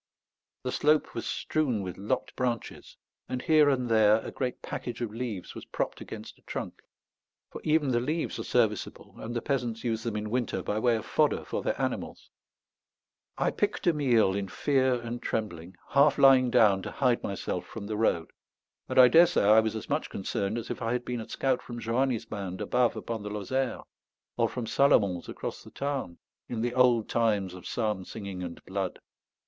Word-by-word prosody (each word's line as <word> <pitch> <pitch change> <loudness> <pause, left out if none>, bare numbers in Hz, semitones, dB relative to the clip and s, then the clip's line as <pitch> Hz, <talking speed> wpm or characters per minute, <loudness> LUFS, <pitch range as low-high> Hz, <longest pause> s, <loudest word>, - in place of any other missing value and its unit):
The - - -2
slope 150 +1 +2
was - - -4
strewn 130 -10 -1
with 90 -2 -5
lopped 105 +6 -2
branches, 120 -3 -3 0.3
and 130 - -2
here 155 +2 +5
and 130 -3 +1
there 110 -2 +5
a - - -5
great 125 -2 -4
package 120 -1 -5
of 115 -3 -3
leaves 115 -6 -5
was - - -8
propped - - -3
against - - -9
a - - -27
trunk; - - -6 0.7
for - - -8
even 155 -2 +2
the 120 -2 +2
leaves 155 +7 -2
are - - -3
serviceable, - - -1
and 120 +2 -6
the 120 - -2
peasants 120 -5 -2
use 115 -2 -1
them 115 -2 -3
in 105 0 -3
winter 125 -2 -1
by 105 - -1
way 120 +1 +3
of 110 - -4
fodder - - +1
for - - -3
their - - -2
animals. - - -4 1.1
I - - +1
picked - - -1
a 175 - +4
meal 120 -10 +3
in 100 0 -2
fear 130 +4 +2
and 120 0 -5
trembling, 90 -5 -4
half 140 +1 +4
lying 130 -2 +6
down 110 -6 +4
to - - -5
hide 125 -3 +2
myself 95 -2 -4
from 110 -3 -7
the 105 +1 -3
road; 95 -7 +1 0.6
and - - -3
I 130 -1 +10
daresay 165 0 +5
I 105 +2 +7
was 110 0 0
as 110 - -5
much 145 +2 -1
concerned 100 +2 -2
as 115 - -5
if - - -5
I 115 +1 0
had 125 0 -2
been 120 -2 -3
a 110 - -10
scout 130 -2 0
from 120 -1 -7
Joani's 120 +1 0
band 95 -3 -5
above 125 -2 +1
upon 115 -2 -4
the 105 - -5
Lozère, 120 +6 -2 0.5
or - - +2
from 125 -2 -4
Salomon's 105 -7 +3
across - - -5
the - - -13
Tarn, 135 -11 -3 0.3
in 115 -2 -3
the 120 +1 -1
old 125 -3 +4
times 105 -5 +1
of 90 - -9
psalm 105 -5 -1
singing 100 -2 -7
and 85 -2 -7
blood. 95 -1 -3
115 Hz, 195 wpm, -28 LUFS, 105-130 Hz, 1.1 s, I